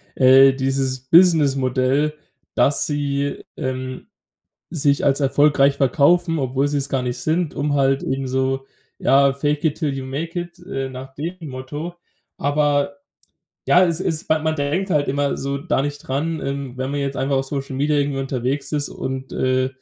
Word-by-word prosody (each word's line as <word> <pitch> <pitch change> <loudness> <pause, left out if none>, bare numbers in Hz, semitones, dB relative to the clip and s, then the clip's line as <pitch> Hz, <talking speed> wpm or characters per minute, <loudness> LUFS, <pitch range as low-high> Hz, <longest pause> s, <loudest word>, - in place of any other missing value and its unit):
äh, 135 +1 +7
dieses 135 -1 -1
Businessmodell, 140 -4 +3 0.4
dass 140 - +3
sie, 140 -1 -2
ähm, 130 0 -4 0.6
sich 145 -4 +1
als 140 0 +2
erfolgreich 140 0 +3
verkaufen, 165 +5 +3
obwohl 135 +1 0
sie 145 - -1
es 140 - -3
gar 130 -2 0
nicht 125 0 -3
sind, 160 +3 -1
um 145 +1 -1
halt 135 0 +2
eben 135 0 -2
so 130 +1 -1 0.3
ja, 140 0 +4
fake 145 +2 -1
it 155 - +1
till 150 -5 -1
you 135 - -5
make 160 +6 -4
it, 175 0 -7
äh, 135 -8 -3
nach 130 +1 -9
dem 165 +5 -4
Motto. 145 +6 -6 0.4
Aber 145 0 +1 0.7
ja, 180 +1 +6
es 170 -1 -1
es 165 -4 -2
man 155 0 +1
denkt 155 +7 -1
halt 145 -3 +2
immer 140 +1 0
so 140 +1 -3
da 150 -3 0
nicht 145 0 -3
dran, 150 +4 -3
ähm, 140 -2 -4
wenn 130 +1 -2
man 145 - -2
jetzt 140 0 -3
einfach 135 0 0
auf 135 - 0
Social 135 -1 -4
Media 145 +2 +1
irgendwie 140 -1 0
unterwegs 135 +2 -2
ist 145 -1 0
und, 130 0 -5
äh, 130 0 +1
140 Hz, 170 wpm, -21 LUFS, 135-150 Hz, 0.7 s, äh